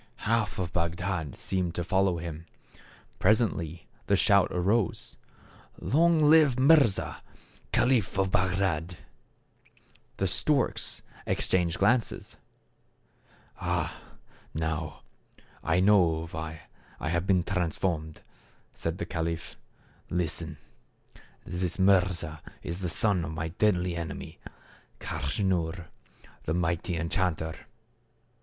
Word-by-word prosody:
Half 115 -1 +1
of 90 -2 -3
Bagdad 85 -2 -2
seemed 90 -3 -2
to 85 - -1
follow 95 0 +2
him. 85 0 -6 0.7
Presently 90 -6 +1 0.2
the - - +4
shout - - +5
arose, 95 +3 0 0.3
" - - -23
Long 165 +2 +3
live 150 -5 +6
Mirza, 135 -7 +4 0.5
caliph 120 -8 +2
of 95 -1 +1
Bagdad! 90 -3 0 0.6
" - - -29
The 95 - 0
storks 130 - 0 0.2
exchanged 90 -2 +1
glances. 115 +4 +1 0.6
" - - -29
Ah! - - -1 0.6
now 80 -2 -3 0.6
I 85 +2 +2
know 90 -5 +4
why 80 0 -6 0.4
I 70 - -2
have 85 +2 0
been 95 -3 +3
transformed," 85 -3 -2 0.5
said 80 +1 -3
the 105 - -3
caliph. 85 -2 -3 0.3
" - - -32
Listen. 80 -1 -3 0.9
This 90 0 -2
Mirza 90 -5 +2 0.2
is 85 +2 -4
the 90 -2 -2
son 95 +1 +2
of 80 0 -4
my 80 +1 -3
deadly 90 -1 +1
enemy, 85 -2 -6 0.6
Kaschnur, 85 +1 -1 0.6
the 80 - 0
mighty 85 0 0
en 80 +1 -2
chanter. 80 -4 -1
90 Hz, 110 wpm, -28 LUFS, 80-95 Hz, 0.9 s, live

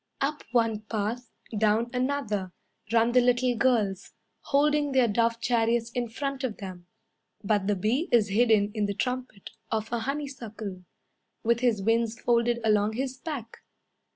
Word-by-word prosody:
Up 295 +2 -1
one 230 -3 +2
path, 225 +3 -2 0.3
Down 220 +3 +2
another, 250 -8 -1 0.4
Run 230 +1 +4
the 250 +1 +5
little 245 0 +2
girls, 220 -6 +1 0.3
Holding 295 0 +2
their 255 -2 +4
dove 230 +2 +1
chariots 235 -1 +1
in 240 -1 -2
front 275 +3 -4
of 240 -5 -2
them; 185 -3 -8 0.6
But 205 -1 +1
the 205 - +2
bee 225 - 0
is 220 -4 +4
hidden 215 -1 +3
in 210 -2 0
the 200 - -3
trumpet 250 -3 -4 0.2
of 220 0 -2
a 235 - +1
honeysuckle, 230 -8 -5 0.6
With 235 0 +2
his 235 -5 +1
wings 225 +1 +1
folded 235 0 +2
along 210 -1 +2
his 260 +2 -3
back. 260 -7 -6
230 Hz, 150 wpm, -27 LUFS, 215-250 Hz, 0.6 s, the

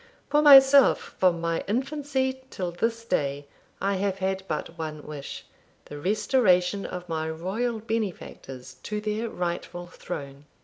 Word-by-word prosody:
For 295 - +4
myself, 275 -2 +7
from 180 -2 +3
my 165 0 -1
infancy 265 +2 -1
till 180 -7 -4
this 230 +6 -2
day 145 -7 -1 0.3
I 200 0 0
have 195 0 -1
had 190 0 -1
but 160 +2 -4
one 155 -2 -6
wish 145 -2 -8 0.4
the 145 - -9
restoration 195 - +2
of 180 0 -7
my 160 -1 -2
royal 195 +9 -2
benefactors 180 - -5
to 210 0 -4
their 215 +2 -2
rightful 175 -1 -4
throne. 140 -5 -8
190 Hz, 135 wpm, -26 LUFS, 165-230 Hz, 0.4 s, myself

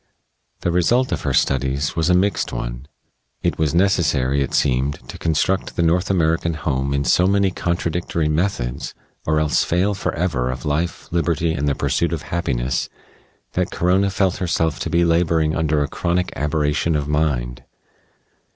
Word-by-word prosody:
The 85 - 0
result 120 +9 +2
of - - -1
her 70 - -1
studies 70 +4 +1
was 80 0 +1
a 90 - +5
mixed 100 +3 +1
one. - - -5 0.6
It - - 0
was 80 0 +1
necessary, 75 -8 +2
it 70 - -1
seemed, 65 +2 +1
to - - -8
construct 85 +4 0
the 85 - +1
North 85 +2 +2
American 80 -2 +1
home 70 -3 -1
in 70 0 0
so 90 +9 +4
many 100 -1 +2
contradictory 85 -2 -1
methods, 75 -6 -2 0.3
or 80 0 +2
else 75 -1 +2
fail 95 +4 +1
forever 80 -9 -1
of 65 -1 -5
life, 75 +4 -2
liberty, 85 -1 0
and 75 -1 -1
the 70 - +1
pursuit 85 -1 0
of 80 -2 -3
happiness, 65 -7 -2 0.6
that - - 0
Corona 95 +3 +2
felt 95 -1 0
herself 80 -3 0
to - - -3
be 85 0 +3
laboring 80 -2 +2
under 75 -2 +1
a - - -2
chronic 85 +5 -1
aberration 75 +2 0
of 75 -1 -1
mind.... 70 -5 -1
80 Hz, 160 wpm, -21 LUFS, 70-85 Hz, 0.6 s, a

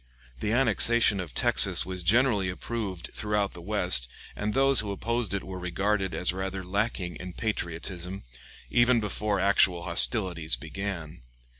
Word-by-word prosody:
The 105 - -2
annexation 115 -3 +3
of 90 -5 -7
Texas - - +5
was 95 -1 -5
generally 105 0 +2
approved 95 -2 -5
throughout 105 -2 -2
the 85 - -10
West, 90 - +1 0.3
and 105 +2 -3
those 135 0 +3
who 105 -2 -3
opposed 115 +3 -2
it 100 -1 -2
were 95 -1 -7
regarded 95 +2 -1
as 90 - 0
rather 95 0 -4
lacking 95 -2 -2
in 90 0 -8
patriotism, 90 -2 -4 0.5
even 120 0 +4
before 105 -1 -2
actual 95 -3 +2
hostilities 85 - +2
began. 85 +3 -7
100 Hz, 140 wpm, -27 LUFS, 90-110 Hz, 0.5 s, Texas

